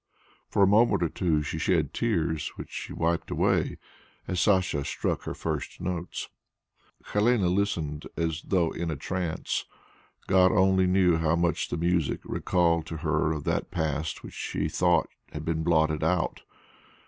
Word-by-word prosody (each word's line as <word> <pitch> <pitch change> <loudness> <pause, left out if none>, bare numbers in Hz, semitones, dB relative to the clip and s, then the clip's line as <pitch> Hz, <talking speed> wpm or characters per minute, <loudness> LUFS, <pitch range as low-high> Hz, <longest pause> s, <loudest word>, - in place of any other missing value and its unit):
For 100 - +3
a - - +6
moment 105 -2 +4
or 85 - +1
two 80 -4 0
she 80 +2 -4
shed 80 -4 +1
tears, 80 -9 -1
which - - -9
she - - -6
wiped 85 0 -1
away - - +1 0.5
as 90 -1 0
Sacha 95 -8 +2
struck - - -2
her - - -4
first - - -4
notes. 90 -1 -4 0.9
Helene 105 0 +3
listened 80 -7 -1
as 80 -1 -1
though 85 -4 +2
in 85 0 -3
a 80 - -2
trance. 85 +3 -3 0.6
God 95 -1 +5
only 95 -1 +4
knew 90 -2 +4
how 80 0 +2
much 85 0 0
the - - -2
music 85 -2 0
recalled 85 -3 +1
to 80 - -5
her 80 0 +2
of 75 -3 -3
that - - -1
past 75 0 -2
which - - -9
she 75 - -2
thought 85 0 +2 0.3
had 75 0 -5
been 80 -1 -1
blotted 80 -2 +2
out. 85 +1 0
85 Hz, 160 wpm, -27 LUFS, 80-95 Hz, 0.9 s, a